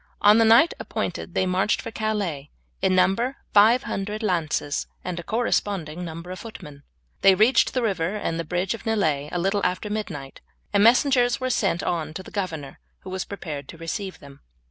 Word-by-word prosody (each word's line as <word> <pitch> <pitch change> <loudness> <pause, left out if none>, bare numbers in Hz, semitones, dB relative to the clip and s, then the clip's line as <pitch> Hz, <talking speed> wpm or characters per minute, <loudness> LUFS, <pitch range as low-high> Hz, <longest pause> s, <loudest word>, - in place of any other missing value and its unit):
On 210 +2 +6
the 225 - +5
night 230 +9 +6
appointed - - -4
they 185 - +2
marched 185 +3 +1
for 230 - -6
Calais, 200 -11 -2 0.3
in 185 - +2
number 230 +9 +2 0.2
five 220 +4 +6
hundred 210 +3 -4
lances 160 -6 -1 0.2
and 180 -1 -4
a - - -6
corresponding 190 -7 -1
number 170 +1 -7
of 185 - -6
footmen. 150 -11 -10 0.4
They 195 -1 +7
reached 225 +8 +4
the 250 - +1
river 195 -3 0
and 165 -6 -3
bridge 180 +3 0
of 230 - -8
Nieullay 155 -10 0
a - - -2
little 195 +3 0
after 185 +3 -1
midnight, 165 -11 -5 0.3
and 200 0 +4
messengers 245 +1 +4
were 255 0 -1
sent 195 -6 0
on 160 -2 -2
to 190 - -5
the - - -12
governor, 160 -9 -4 0.2
who 185 - -9
was 185 0 -3
prepared 150 -8 -6
to 165 - -11
receive 185 +4 -5
them. 140 -1 -14
190 Hz, 185 wpm, -24 LUFS, 165-215 Hz, 0.4 s, They